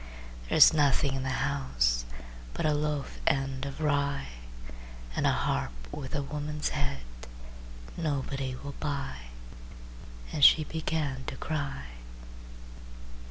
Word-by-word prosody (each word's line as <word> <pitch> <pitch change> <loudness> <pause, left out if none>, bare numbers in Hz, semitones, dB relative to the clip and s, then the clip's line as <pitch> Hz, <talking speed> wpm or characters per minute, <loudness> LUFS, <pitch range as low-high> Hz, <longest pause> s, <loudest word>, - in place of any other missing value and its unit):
"There's - - +8
nothing 140 -2 +3
in 135 - -2
the 130 - -2
house 65 - +1 0.5
But - - -1
a 155 - +4
loaf 150 -1 -2
end 135 0 +1
of 140 - -7
rye, 140 - 0 0.9
And - - +2
a - - +5
harp - - 0 0.2
with 130 0 -5
a 145 - 0
woman's 150 +1 -3
head 140 -1 -2 0.9
Nobody 140 -4 -2
will 140 +2 -7
buy," 140 - -3 1.1
And 145 - -1
she 155 - +9
began 150 -4 -2
to - - -4
cry. 140 - -3
140 Hz, 115 wpm, -29 LUFS, 135-150 Hz, 1.1 s, she